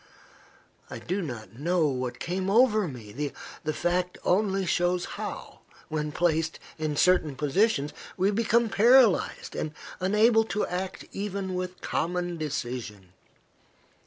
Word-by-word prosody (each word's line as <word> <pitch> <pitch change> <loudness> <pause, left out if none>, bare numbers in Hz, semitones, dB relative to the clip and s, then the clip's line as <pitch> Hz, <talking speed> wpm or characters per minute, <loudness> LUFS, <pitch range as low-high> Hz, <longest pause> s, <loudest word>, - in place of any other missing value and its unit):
I - - -6
do 190 +3 -2
not 120 - -7
know 170 +2 +2
what 125 -3 -2
came 185 +2 -2
over 215 -2 +4
me. 130 +2 -5 0.3
The 155 - 0
fact 180 +3 -1
only 195 0 +2
shows 175 0 +1
how, - - -7 0.3
when 150 -1 -2
placed 160 0 0 0.2
in 155 -1 -1
certain 160 -3 +3
positions, 150 - +1 0.2
we 195 +2 +3
become 230 +2 +2
paralyzed, 230 0 +4
and 155 -1 -3 0.2
unable 215 +4 +4
to 210 -1 -1
act 185 +1 -4
even 195 -1 -3
with 180 0 -4
common 175 0 -1
decision. 120 - -5
180 Hz, 125 wpm, -27 LUFS, 150-195 Hz, 0.3 s, over